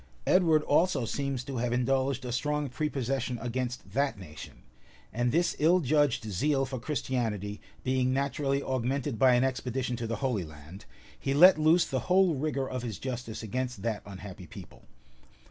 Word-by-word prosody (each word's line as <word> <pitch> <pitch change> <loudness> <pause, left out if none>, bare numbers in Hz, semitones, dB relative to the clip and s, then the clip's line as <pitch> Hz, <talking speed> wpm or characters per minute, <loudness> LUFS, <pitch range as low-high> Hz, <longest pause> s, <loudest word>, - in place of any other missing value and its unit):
[] - - -31
Edward 160 -4 +4
also 150 -4 +2
seems 135 +2 -2
to 135 0 -5
have 120 0 -1
indulged 130 +1 0
a 125 - -3
strong 150 +3 -1
prepossession 135 -3 -2
against 120 -3 -4
that 135 +1 0
nation; 80 -6 -11 0.5
and 120 +1 +1
this 170 +3 +1
ill 170 +4 +5
judged 145 -5 +2
zeal 135 +7 0
for 130 -1 -5
Christianity 115 -6 -2 0.2
being 130 0 +1
naturally 140 +1 0
augmented 130 0 -2
by 130 -2 +6
an 120 - +3
expedition 130 -1 -1
to 115 -1 -4
the 115 - -2
Holy 115 -8 0
Land, 75 +4 -12 0.3
he 135 0 -1
let 175 +2 +8
loose 160 +3 +4
the 130 - -2
whole 185 -1 +5
rigor 135 -2 -1
of 130 -1 -4
his 115 -5 -5
justice 125 -4 -5
against 125 -1 -3
that 110 -3 -1
unhappy 95 -2 -9
people. - - -13
130 Hz, 165 wpm, -29 LUFS, 115-140 Hz, 0.5 s, let